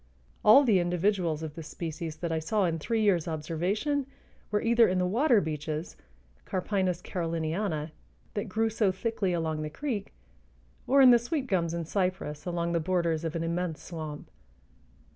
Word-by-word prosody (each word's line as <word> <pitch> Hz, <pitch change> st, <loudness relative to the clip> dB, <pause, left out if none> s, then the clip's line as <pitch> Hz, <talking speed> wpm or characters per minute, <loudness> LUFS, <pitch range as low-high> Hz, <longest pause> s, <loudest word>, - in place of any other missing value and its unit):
All 220 Hz, +7 st, +8 dB
the 215 Hz, -8 st, +4 dB
individuals 175 Hz, -2 st, 0 dB
of 155 Hz, -2 st, -5 dB
this 160 Hz, -1 st, -8 dB
species 165 Hz, -1 st, -5 dB
that 165 Hz, +1 st, -4 dB
I 160 Hz, -, 0 dB
saw 200 Hz, +5 st, +1 dB
in 165 Hz, -2 st, -1 dB
three 220 Hz, +7 st, 0 dB
years' 180 Hz, -6 st, +2 dB
observation 180 Hz, -, -1 dB, 0.4 s
were 210 Hz, -, 0 dB
either 235 Hz, 0 st, +5 dB
in 185 Hz, -, 0 dB
the 180 Hz, -, +2 dB
water 235 Hz, +5 st, +3 dB
beeches 155 Hz, +1 st, -4 dB, 0.5 s
(Carpinus 185 Hz, -2 st, -1 dB
caroliniana) 165 Hz, -1 st, -2 dB, 0.4 s
that 205 Hz, +1 st, -3 dB
grew 225 Hz, +3 st, 0 dB
so 210 Hz, -3 st, +2 dB
thickly 200 Hz, 0 st, -1 dB
along 160 Hz, -3 st, -1 dB
the 155 Hz, -, -3 dB
creek 220 Hz, -, -4 dB, 0.8 s
or 275 Hz, +1 st, +5 dB
in 255 Hz, -2 st, +9 dB
the 240 Hz, -, +7 dB
sweet 265 Hz, +4 st, -2 dB
gums 170 Hz, -7 st, 0 dB
and 170 Hz, -2 st, -4 dB
cypress 180 Hz, -5 st, -2 dB
along 170 Hz, -1 st, -1 dB
the 170 Hz, -, +1 dB
borders 170 Hz, -1 st, 0 dB
of 165 Hz, -1 st, -3 dB
an 165 Hz, -, -1 dB
immense 170 Hz, -1 st, -2 dB
swamp. 155 Hz, -4 st, -7 dB
180 Hz, 165 wpm, -29 LUFS, 160-210 Hz, 0.8 s, in